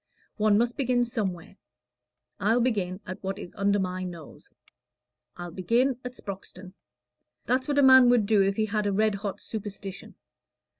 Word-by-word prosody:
One 210 -1 +3
must 240 +2 0
begin 250 -2 +1
somewhere: 195 -6 -4 0.8
I'll 220 +5 +2
begin 205 -6 -1
at 185 - -7
what 195 +1 -3
is 180 - -9
under 200 0 +2
my 185 -1 -2
nose. 170 -4 -10 0.9
I'll 175 -1 -7
begin 235 +9 +1
at 250 0 -6
Sproxton. 190 -2 -9 0.7
That's 255 +3 0
what 290 -1 -1
a 285 - +5
man 260 -2 +8
would 240 -4 +4
do 210 -1 +3
if 195 0 +1
he 220 - +1
had 210 0 -1
a - - +1
red 215 +2 +2
hot 200 0 -5
superstition. 200 -3 -7
205 Hz, 160 wpm, -27 LUFS, 190-240 Hz, 0.9 s, man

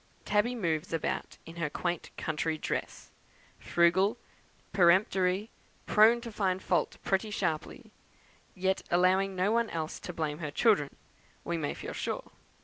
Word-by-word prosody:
Tabby 210 +4 +2
moves 170 -6 -1
about 165 - -2
in 165 +1 -11
her 165 -3 -1
quaint 175 +2 -3
country 160 0 -1
dress, - - -4 0.5
frugal, 185 +6 +3 0.6
peremptory, 185 +2 +3 0.3
prone 225 +2 +5
to 235 -1 -7
find 190 -3 0
fault - - 0
pretty 195 +2 0
sharply, 170 -7 -3 0.6
yet 190 +1 0
allowing 185 +2 +3
no 185 +3 +1
one 230 0 +2
else 160 -1 -4
to - - -6
blame 155 -2 -3
her 155 -3 -3
children, 150 -3 +3 0.5
we 170 - -2
may 155 -3 -2
feel - - -6
sure. - - -4
185 Hz, 140 wpm, -30 LUFS, 165-205 Hz, 0.6 s, prone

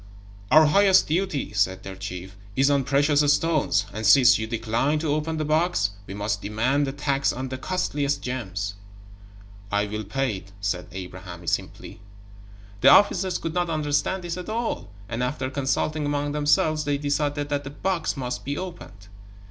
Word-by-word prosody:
"Our 155 0 +7
highest 190 +5 +5
duty," 160 - -1
said 95 -2 0
their 95 0 -7
chief, 95 0 -7 0.2
"is 135 +2 +3
on 140 -2 +2
precious 145 +2 +3
stones, 155 +1 +2
and 110 - -5
since 125 0 +6
you 110 - -3
decline 115 +6 0
to 150 -1 0
open 155 +1 -2
the 155 - -1
box, 155 - +1 0.2
we 95 - -7
must 105 0 -2
demand 130 +7 0
the - - -2
tax 140 -1 0
on 130 +1 -5
the 130 0 -5
costliest 145 -5 -1
gems." 100 -6 -3 1.0
"I 105 0 +1
will 110 +1 -4
pay 115 +1 -1
it," 95 +1 -14
said 95 -3 -2
Abraham, 90 -1 -8
simply. 85 - -4 0.8
The - - +6
officers 190 -3 +5
could 165 - -4
not 175 0 0
understand 155 +4 0
this 175 0 -4
at 180 +3 -7
all, 230 - -3 0.2
and 115 +2 -4
after 130 +1 -2
consulting 145 +2 -1
among 145 0 -1
themselves, 150 +1 +2
they 145 0 0
decided 145 0 -1
that 145 -1 -1
the 135 - -6
box 170 +1 -2
must 125 -2 -4
be 140 +1 -3
opened. 135 - -8
140 Hz, 170 wpm, -25 LUFS, 105-155 Hz, 1.0 s, Our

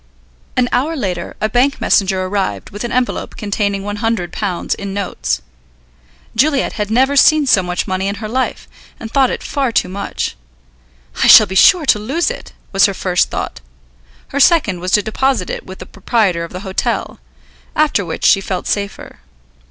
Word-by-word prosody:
An 250 -1 +3
hour 285 +7 0
later 180 - -4
a 215 - +1
bank 250 +5 +1
messenger 190 -1 +2
arrived 195 +1 -3
with 205 +3 -6
an 240 - -4
envelope 250 0 -2
containing 200 -2 -2
£100 205 -3 -2
in 200 -1 -6
notes. 180 - -2 0.9
Juliet 275 +3 +2
had 210 -1 -3
never 260 +5 +2
seen 305 +1 +5
so 210 -7 +4
much 180 -1 -2
money 190 +1 -2
in 200 - -2
her 215 +1 -6
life, 255 +4 -2 0.3
and 225 - -8
thought 265 -1 +3
it - - -4
far 270 -4 -1
too 180 - +1
much. 200 - -4 0.9
"I - - +4
shall 215 - +9
be 190 - -7
sure 330 - +5
to 215 - +3
lose 290 - -1
it," - - -9 0.2
was 195 +1 +4
her 195 - -4
first 180 -2 +1
thought. - - -5 0.7
Her 280 - -2
second 275 - +3
was 180 +1 -4
to 210 - +4
deposit 225 -2 0
it - - -6
with 190 0 -9
the - - -9
proprietor 200 -4 0
of 170 - -8
the 185 - -7
hotel; 190 -2 -3 0.6
after 300 -9 +2
which 165 -3 -4
she 195 - +5
felt 190 -1 -4
safer. 200 -1 -4
205 Hz, 175 wpm, -16 LUFS, 190-255 Hz, 0.9 s, shall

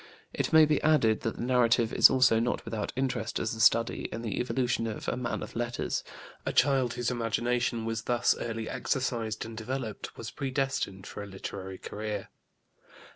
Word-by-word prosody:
It - - -1
may 160 -1 +8
be 150 -1 +1
added 130 -9 +3
that 115 - -2
the - - -5
narrative 120 -2 +3
is - - +8
also 130 -4 +4
not 120 +2 -1
without 115 -2 -3
interest 125 -3 -1
as 110 - -1
a 110 - -7
study 115 +1 +3
in 115 - -5
the 110 -4 -2
evolution 125 -2 0
of 110 - -5
a - - 0
man 125 -1 -3
of - - -9
letters; 120 0 -2 0.4
a - - -1
child 130 -3 +3
whose 120 0 -1
imagination 120 0 0
was 115 0 -2
thus 120 0 +2
early 115 -1 -3
exercised 115 -5 -2
and 115 0 -8
developed 115 0 -5
was 115 - -6
predestined 135 -8 -2
for - - -7
a 105 - -7
literary 95 -1 -7
career. 105 0 -5
115 Hz, 180 wpm, -29 LUFS, 110-125 Hz, 0.4 s, may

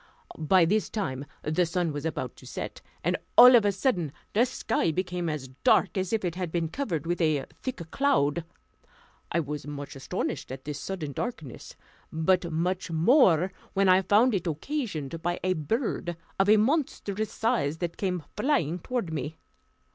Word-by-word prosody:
By 170 +3 +4
this 210 +5 +1
time 140 - -3 0.2
the 155 +4 +1
sun 170 -1 -1
was 145 +2 -3
about 160 - -4
to - - -13
set, - - -6 0.2
and - - +1 0.2
all 250 +1 +11
of 225 -3 +5
a 205 - +4
sudden 185 - 0 0.2
the 235 +5 +4
sky 225 -7 0
became 180 0 -2
as 145 -4 -4
dark - - +4
as 185 -2 -1
if 220 -4 0
it 175 - -1
had 180 -2 -4
been 165 -2 -1
covered 170 - -3
with 175 +1 -1
a 155 -4 +2 0.2
thick 175 -11 -5
cloud. 170 - +2 0.9
I 170 - +2
was 150 -1 -5
much 145 -1 -6
astonished 135 -1 -4
at 130 0 -8
this 145 -1 -4
sudden 170 -6 -4
darkness, 155 - -6 0.4
but 170 +2 +1
much 180 +3 -1
more 180 - +4 0.2
when 195 0 +3
I 185 +1 +6
found 210 +6 +4
it 185 -3 -1
occasioned 165 - -3
by 175 +1 -1
a 185 0 +2
bird 175 - -2 0.2
of 195 +1 +3
a 215 - +7
monstrous 220 -5 0
size, 220 - 0
that 170 0 -3
came 180 -4 -2
flying 200 - +1
toward 210 -4 -3
me. 150 +1 -4
175 Hz, 170 wpm, -27 LUFS, 155-210 Hz, 0.9 s, all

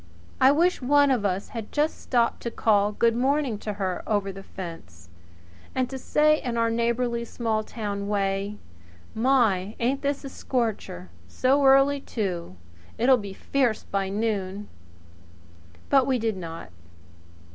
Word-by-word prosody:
I 265 - +7
wish 340 +4 +2
one 285 +2 +4
of 235 -6 +1
us 195 0 -1
had 225 -3 -7
just 300 +1 0
stopped 235 -2 +1
to 235 - -3
call 210 -3 +2
good 230 +2 +2
morning 265 -2 +1
to 210 - -4
her 190 -2 -2
over 205 -2 0
the 195 +1 -9
fence, 165 - -10 0.7
and 260 -1 +1
to 265 - -5
say 305 +3 +3
in 240 -2 -3
our 230 0 +2
neighbourly, 235 +1 0
small 225 -2 -2
town 205 -2 -4
way: 200 0 -1 0.6
"My, 220 -5 +2
ain't 260 +4 0
this 280 0 -1
a - - -5
scorcher! 220 - -3 0.2
So 265 - +2
early 275 +1 +5
too! 185 - -4 0.4
It'll 255 +3 +5
be 200 -4 -7
fierce 245 +1 0
by 195 -1 -2
noon!" 205 -1 -2 1.2
But 270 -2 +5
we 260 -2 +2
did 225 -2 -1
not. 165 - -8
230 Hz, 145 wpm, -25 LUFS, 200-260 Hz, 1.2 s, I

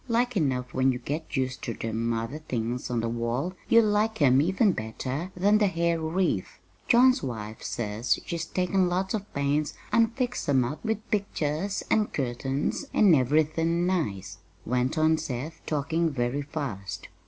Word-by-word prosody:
"Like 245 +1 +1
enough 130 -8 0
when 130 0 +3
you 125 - -2
get 150 +4 -4
used 130 0 -1
ter 115 - -3
them 115 +1 -2
other 115 +6 -3
things 125 -4 -3
on 120 -2 0
the 115 - -1
wall 120 +8 -2 0.2
you'll 230 -1 +6
like 215 +1 +1
'em 135 -2 +5
even 190 +6 +3
better 130 - -4
than 205 +4 +4
the 210 - +4
hair 170 -2 0
wreath. 160 - -1 0.3
John's 255 +2 +5
wife 110 -3 -5
says 110 +1 -1
she's 170 -1 -3
taken 185 0 +1
lots 185 +2 -1
of 205 -2 -4
pains 145 +2 0 0.2
an' 230 0 +5
fixed 245 - -3
'em 130 -3 +4
up 145 +5 -5
with 220 -1 -2
pictures 195 -2 -1
an' 215 -1 +3
curtains 135 - -2
an' 200 -5 +6
everythin' 155 +5 +2
nice," 155 - -2 0.3
went 125 +5 0
on 155 0 +3
Seth, 145 +6 -5
talking 160 +3 0
very 130 0 -1
fast. 135 - -5
155 Hz, 165 wpm, -27 LUFS, 125-185 Hz, 0.3 s, you'll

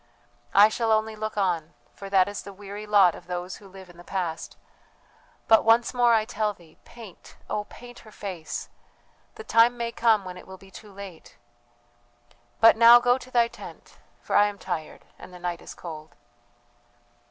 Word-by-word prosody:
"I 205 +2 +8
shall 225 +1 -1
only 220 0 +1
look 215 0 -5
on; 175 -5 -1 0.2
for 195 - -10
that 190 -1 +3
is 205 0 -6
the 200 - -10
weary 205 +2 -9
lot 200 -4 +5
of 175 - -13
those 180 +1 -5
who 205 - -16
live 190 0 -13
in 175 -1 -17
the 175 - -13
past: 175 -4 -5 0.9
but 225 -1 +5
once 230 +2 +3
more 240 -2 +4
I 215 -1 +1
tell 215 -2 -2
thee, 165 -3 -21
paint, 225 -7 -14
oh, 210 0 -3
paint 245 +2 -13
her 215 - -16
face 185 -7 -7 0.7
the 445 - -9
time 235 - +3
may 235 -1 -3
come 225 -4 +2
when 180 -1 -8
it - - -13
will 190 0 -11
be 195 0 -18
too 210 +2 -13
late! 195 -4 -12 1.2
"But 225 0 +6
now 235 +1 +8
go 245 +1 +2
to 255 - -13
thy 240 -2 +3
tent, - - -13 0.2
for - - -3
I 205 0 +5
am 205 -1 -6
tired 155 -5 -6
and - - -12
the 180 - -11
night 175 -1 -5
is - - -11
cold." 155 -2 -10
205 Hz, 185 wpm, -25 LUFS, 180-225 Hz, 1.2 s, I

